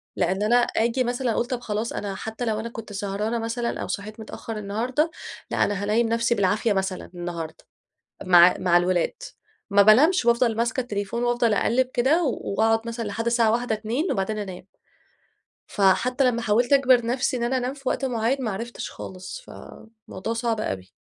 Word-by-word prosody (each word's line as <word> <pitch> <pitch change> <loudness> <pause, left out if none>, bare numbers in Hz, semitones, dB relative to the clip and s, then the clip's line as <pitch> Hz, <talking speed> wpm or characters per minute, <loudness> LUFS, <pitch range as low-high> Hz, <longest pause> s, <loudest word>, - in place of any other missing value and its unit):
لأن 190 +3 0
أنا 235 +3 +3
آجي 240 +1 +2
مثلًا 245 0 -1
أقول 235 - 0
طب 250 -1 -3
خلاص 215 0 -3
أنا 200 -2 -4
حتّى 220 +4 -5
لو 215 -1 -1
أنا 230 +1 -4
كنت 220 -2 -9
سهرانة 205 +3 -2
مثلًا 230 +1 -3
أو - - -4
صحيت 215 +2 -5
متأخّر 220 0 -7
النهارده 240 +10 -1 0.4
لأ، - - +2
أنا 200 -1 -2
هانيم 225 +3 +2
نفسي 235 +1 +1
بالعافية 205 +2 +1
مثلًا 190 -1 -3
النهارده 170 -2 -6 0.6
مع 175 -1 +7
مع 175 -1 +4
الولاد، 175 0 +1 0.6
ما 200 0 +5
بانمش 260 - +5
وأفضل 235 -1 +3
ماسكة 240 +3 0
التليفون 210 0 -3
وأفضل 240 -2 +2
أقلَِب 250 +5 +2
كده 280 +8 +3
وأقعد 225 -3 0
مثلًا 230 -1 -4
لحد 225 +3 -4
الساعة 235 -2 +3
01:00، 240 -1 0
02:00 235 - -2
وبعدين 205 +2 -2
أنام. 190 -3 -6 1.0
فحتى 245 +7 +2
لما 240 -2 +2
حاولت 240 +5 +2
أجبر 255 -4 +4
نفسي 250 +2 0
إن 235 - -3
أنا 260 +2 +1
أنام 250 +2 -2
في 275 -2 -4
وقت 270 - -1
معين 250 +2 0
ما 220 - -1
عرفتش 230 +5 -5
خالص. 185 - -8
فموضوع 220 - -9
صعب 230 -1 -1
أوي. 95 - -4
225 Hz, 175 wpm, -24 LUFS, 205-245 Hz, 1.0 s, مع